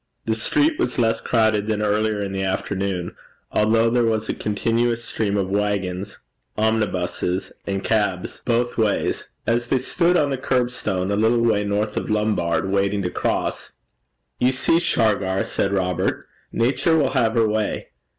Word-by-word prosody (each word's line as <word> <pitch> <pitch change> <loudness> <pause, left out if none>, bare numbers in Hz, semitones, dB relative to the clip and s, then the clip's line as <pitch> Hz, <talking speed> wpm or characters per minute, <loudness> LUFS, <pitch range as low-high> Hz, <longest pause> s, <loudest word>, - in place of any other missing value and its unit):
The 110 - +1
street 305 - +1
was - - 0
less 115 -2 +1
crowded 110 -3 +1
than 110 -1 0
earlier 105 0 +1
in 100 -1 -3
the 95 0 -2
afternoon, 95 -1 -2 0.4
although 115 +2 +3
there 120 0 +3
was 110 -1 0
a - - +1
continuous 115 +3 0
stream 105 -2 -1
of 95 -1 -1
waggons, 100 -2 -2 0.4
omnibuses, 95 -4 -1 0.2
and 95 -1 -2
cabs 100 -5 -1
both 120 0 0
ways. 110 -2 0 0.2
As 120 +1 0
they 130 - +2
stood 170 +7 +2
on 145 -3 +2
the 135 - -2
curbstone, 120 -8 -1
a - - +1
little 115 +3 +2
way 110 -3 +2
north 105 +1 -1
of - - -2
Lombard 105 -6 +1
Street, 95 0 -3
waiting 100 0 +1
to 90 - -2
cross - - -2 0.7
'You 125 +1 +3
see, 135 +5 +2
Shargar,' 100 - +1
said 100 - -1
Robert, 95 -2 -1 0.3
'Nature 135 +7 +2
will 140 -4 +2
have 115 -1 +1
her 115 -1 +3
way. 110 0 -2
110 Hz, 160 wpm, -22 LUFS, 100-115 Hz, 0.7 s, although